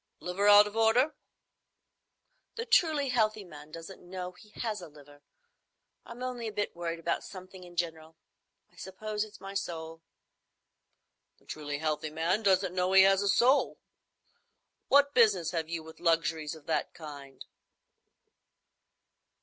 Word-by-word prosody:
"Liver 185 Hz, +3 st, -1 dB
out 205 Hz, 0 st, +9 dB
of 210 Hz, +1 st, -7 dB
order?" 230 Hz, +7 st, +3 dB, 1.4 s
"The 460 Hz, -, -4 dB
truly 310 Hz, -, +3 dB
healthy 215 Hz, -4 st, +1 dB
man 150 Hz, -4 st, -12 dB
doesn't 165 Hz, +4 st, -10 dB
know 180 Hz, 0 st, -6 dB
he 210 Hz, +4 st, -18 dB
has 215 Hz, -4 st, -3 dB
a 175 Hz, -, -9 dB
liver. 145 Hz, -1 st, -17 dB, 0.9 s
I'm 240 Hz, +2 st, -8 dB
only 245 Hz, -2 st, -4 dB
a -, -, -4 dB
bit 205 Hz, -3 st, -3 dB
worried 170 Hz, -1 st, -3 dB
about 165 Hz, 0 st, -2 dB
things 185 Hz, -1 st, -11 dB
in 180 Hz, -2 st, -12 dB
general. 160 Hz, -2 st, -4 dB, 0.5 s
I -, -, -27 dB
suppose 210 Hz, +2 st, -4 dB
it's 215 Hz, -1 st, -12 dB
my 195 Hz, 0 st, -8 dB
soul." 165 Hz, -4 st, -5 dB, 1.4 s
"The -, -, -29 dB
truly 145 Hz, -1 st, -5 dB
healthy 155 Hz, 0 st, -2 dB
man 165 Hz, +7 st, 0 dB
doesn't 190 Hz, -3 st, +2 dB
know 185 Hz, +1 st, 0 dB
he 190 Hz, 0 st, +8 dB
has 195 Hz, 0 st, +4 dB
a 200 Hz, -, 0 dB
soul. 255 Hz, +7 st, +3 dB, 1.1 s
What 285 Hz, 0 st, +4 dB
business 200 Hz, -9 st, +4 dB
have 165 Hz, -2 st, -3 dB
you 165 Hz, -1 st, -4 dB
with 160 Hz, 0 st, -13 dB
luxuries 165 Hz, -2 st, 0 dB
of 155 Hz, -2 st, -15 dB
that 160 Hz, -, -2 dB
kind?" 140 Hz, -4 st, -10 dB
185 Hz, 145 wpm, -30 LUFS, 160-215 Hz, 1.4 s, out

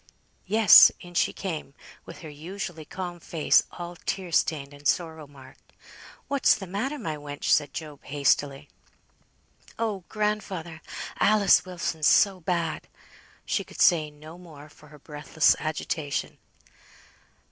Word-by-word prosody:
Yes; 215 Hz, 0 st, +8 dB
in 175 Hz, 0 st, -13 dB
she -, -, +2 dB
came 160 Hz, -7 st, -6 dB, 0.3 s
with -, -, -11 dB
her 160 Hz, -, -9 dB
usually 165 Hz, +1 st, -7 dB
calm 175 Hz, 0 st, -7 dB
face 165 Hz, -2 st, +2 dB
all 175 Hz, 0 st, -8 dB
tear 185 Hz, -3 st, -3 dB
stained 145 Hz, -3 st, 0 dB
and 145 Hz, 0 st, -5 dB
sorrow 160 Hz, -3 st, -1 dB
marked. 135 Hz, -2 st, -18 dB, 0.5 s
"What's 280 Hz, -1 st, +3 dB
the 205 Hz, -, -7 dB
matter, 215 Hz, +11 st, -3 dB
my 160 Hz, -, -4 dB
wench?" 145 Hz, -1 st, -9 dB
said 145 Hz, -, +2 dB
Job, 150 Hz, -3 st, -8 dB
hastily. 140 Hz, -1 st, 0 dB, 1.1 s
"Oh! 215 Hz, -5 st, -2 dB
grandfather! 195 Hz, -6 st, -3 dB, 0.4 s
Alice 205 Hz, -3 st, +4 dB
Wilson's 170 Hz, -4 st, -2 dB
so 195 Hz, -2 st, +4 dB
bad!" 170 Hz, -2 st, -2 dB, 0.6 s
She -, -, -1 dB
could -, -, -14 dB
say 155 Hz, -3 st, +4 dB
no 155 Hz, +3 st, -13 dB
more, 155 Hz, -4 st, -13 dB
for 150 Hz, +1 st, -19 dB
her 150 Hz, 0 st, -15 dB
breathless 150 Hz, +2 st, +1 dB
agitation. 155 Hz, -1 st, -4 dB
165 Hz, 130 wpm, -26 LUFS, 150-185 Hz, 1.1 s, Yes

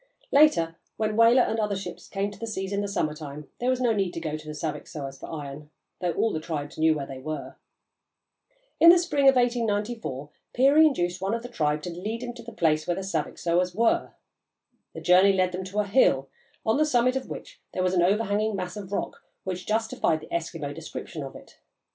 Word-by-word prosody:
Later, 170 Hz, -, +4 dB, 0.2 s
when 215 Hz, -1 st, 0 dB
whaler 230 Hz, +3 st, +6 dB
and 225 Hz, -, -1 dB
other 210 Hz, -2 st, 0 dB
ships 195 Hz, -, -7 dB
came 200 Hz, +1 st, -2 dB
to -, -, -13 dB
the 230 Hz, -, -4 dB
seas 195 Hz, -2 st, -3 dB
in 200 Hz, -, 0 dB
the 205 Hz, -, -2 dB
summer 175 Hz, -6 st, -1 dB
time, 150 Hz, -1 st, -9 dB
there 245 Hz, -, 0 dB
was 255 Hz, -1 st, +1 dB
no 245 Hz, -3 st, +2 dB
need 195 Hz, -4 st, -1 dB
to -, -, -2 dB
go 155 Hz, -2 st, -3 dB
to 155 Hz, 0 st, -9 dB
the 150 Hz, -, -6 dB
Saviksoahs 145 Hz, -3 st, -5 dB
for -, -, -8 dB
iron, 150 Hz, -1 st, -7 dB, 0.3 s
though 175 Hz, -1 st, -1 dB
all 225 Hz, -, +1 dB
the 155 Hz, -, -1 dB
tribes 155 Hz, -3 st, -5 dB
knew 160 Hz, 0 st, +4 dB
where 140 Hz, -2 st, -3 dB
they 135 Hz, -1 st, -8 dB
were. 155 Hz, +3 st, -6 dB, 1.2 s
In 335 Hz, -, +9 dB
the 350 Hz, -, +9 dB
spring 290 Hz, -5 st, +4 dB
of 270 Hz, -, +4 dB
1894 225 Hz, -, -1 dB, 0.2 s
Peary 280 Hz, +5 st, +6 dB
induced 180 Hz, -, -1 dB
one 195 Hz, +4 st, 0 dB
of 230 Hz, -, -5 dB
the 245 Hz, -, -7 dB
tribe 150 Hz, -8 st, 0 dB
to 175 Hz, -, -4 dB
lead 215 Hz, +8 st, -4 dB
him 240 Hz, -1 st, -5 dB
to 235 Hz, -, -10 dB
the 235 Hz, 0 st, -9 dB
place 155 Hz, -7 st, +1 dB
where 175 Hz, -, +1 dB
the 195 Hz, -, -4 dB
Saviksoahs 180 Hz, -2 st, -1 dB
were. 230 Hz, +2 st, +2 dB, 0.8 s
The -, -, -6 dB
journey 185 Hz, +2 st, +6 dB
led 185 Hz, -1 st, +2 dB
them 185 Hz, +1 st, -4 dB
to 200 Hz, +3 st, -1 dB
a -, -, -3 dB
hill, 140 Hz, -, +3 dB, 0.4 s
on 220 Hz, +3 st, +2 dB
the 305 Hz, -, +4 dB
summit 255 Hz, -2 st, +3 dB
of 265 Hz, -, -3 dB
which -, -, -9 dB
there 185 Hz, -, 0 dB
was 185 Hz, 0 st, +1 dB
an 180 Hz, -, +3 dB
overhanging 210 Hz, +3 st, +1 dB
mass 180 Hz, -1 st, -4 dB
of 200 Hz, -2 st, -8 dB
rock 205 Hz, -, -3 dB, 0.2 s
which 185 Hz, -1 st, -5 dB
justified 220 Hz, -7 st, +1 dB
the 155 Hz, -, -11 dB
Eskimo 160 Hz, -3 st, -3 dB
description 160 Hz, 0 st, -7 dB
of 135 Hz, -1 st, -7 dB
it. -, -, -14 dB
190 Hz, 220 wpm, -26 LUFS, 160-230 Hz, 1.2 s, In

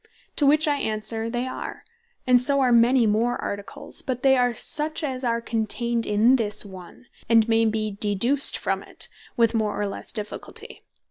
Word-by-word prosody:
To 290 Hz, -, +3 dB
which 305 Hz, +2 st, +4 dB
I 290 Hz, -1 st, +1 dB
answer, 220 Hz, -1 st, -1 dB
they 240 Hz, +1 st, -2 dB
are; 260 Hz, -, -7 dB, 0.4 s
and 250 Hz, -1 st, +4 dB
so 280 Hz, +2 st, +3 dB
are 255 Hz, -2 st, +2 dB
many 240 Hz, +1 st, +4 dB
more 225 Hz, +3 st, 0 dB
Articles: 200 Hz, 0 st, -5 dB
but 250 Hz, -1 st, -5 dB
they 265 Hz, -1 st, +5 dB
are 245 Hz, -1 st, +2 dB
such, 310 Hz, +7 st, -1 dB
as 265 Hz, -3 st, -4 dB
are 235 Hz, -1 st, 0 dB
contained 230 Hz, +1 st, -2 dB
in 220 Hz, +5 st, +3 dB
this 210 Hz, -2 st, 0 dB
one, 180 Hz, -, -13 dB, 0.2 s
and 225 Hz, -1 st, +4 dB
may 225 Hz, 0 st, +2 dB
be 215 Hz, -1 st, -1 dB
deduced 235 Hz, +7 st, +4 dB
from -, -, -2 dB
it, -, -, -3 dB, 0.3 s
with 230 Hz, -1 st, +3 dB
more, 215 Hz, -2 st, -1 dB
or 205 Hz, -, -1 dB
lesse 200 Hz, -, -6 dB
difficulty. 210 Hz, -2 st, -6 dB
235 Hz, 180 wpm, -24 LUFS, 215-255 Hz, 0.4 s, they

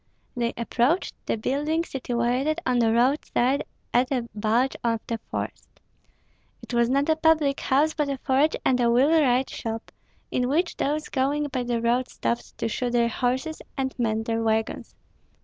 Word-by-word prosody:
They 235 Hz, -1 st, 0 dB
approached 245 Hz, +8 st, +1 dB
the -, -, 0 dB
building 295 Hz, +8 st, 0 dB
situated 255 Hz, +2 st, -1 dB
on 250 Hz, -1 st, +2 dB
the 225 Hz, -1 st, +3 dB
roadside 255 Hz, +2 st, +2 dB, 0.3 s
at 250 Hz, +2 st, +2 dB
a 245 Hz, -3 st, -1 dB
bulge 225 Hz, +5 st, +1 dB
of 230 Hz, -1 st, +1 dB
the 230 Hz, -1 st, -3 dB
forest. -, -, -6 dB, 0.8 s
It -, -, -8 dB
was 235 Hz, 0 st, +3 dB
not 275 Hz, +2 st, +2 dB
a 315 Hz, -, +3 dB
public 315 Hz, -3 st, +3 dB
house, 295 Hz, +4 st, +2 dB
but 295 Hz, -2 st, -1 dB
a 275 Hz, -, -2 dB
forge 275 Hz, +4 st, +2 dB
and 255 Hz, -1 st, +3 dB
a 240 Hz, -1 st, +3 dB
wheelwright 265 Hz, 0 st, +3 dB
shop, 225 Hz, 0 st, -5 dB, 0.4 s
in 250 Hz, 0 st, 0 dB
which 335 Hz, +5 st, 0 dB
those 300 Hz, +2 st, -1 dB
going 290 Hz, +2 st, 0 dB
by 255 Hz, -2 st, -2 dB
the 240 Hz, -1 st, -1 dB
road 240 Hz, +2 st, +1 dB
stopped 235 Hz, -, -3 dB
to -, -, -1 dB
shoe 245 Hz, +2 st, -2 dB
their 235 Hz, -1 st, +2 dB
horses 260 Hz, +7 st, -1 dB, 0.2 s
and 265 Hz, -1 st, -1 dB
mend 220 Hz, -1 st, 0 dB
their 230 Hz, 0 st, -1 dB
wagons. 220 Hz, 0 st, -1 dB
255 Hz, 165 wpm, -25 LUFS, 235-285 Hz, 0.8 s, the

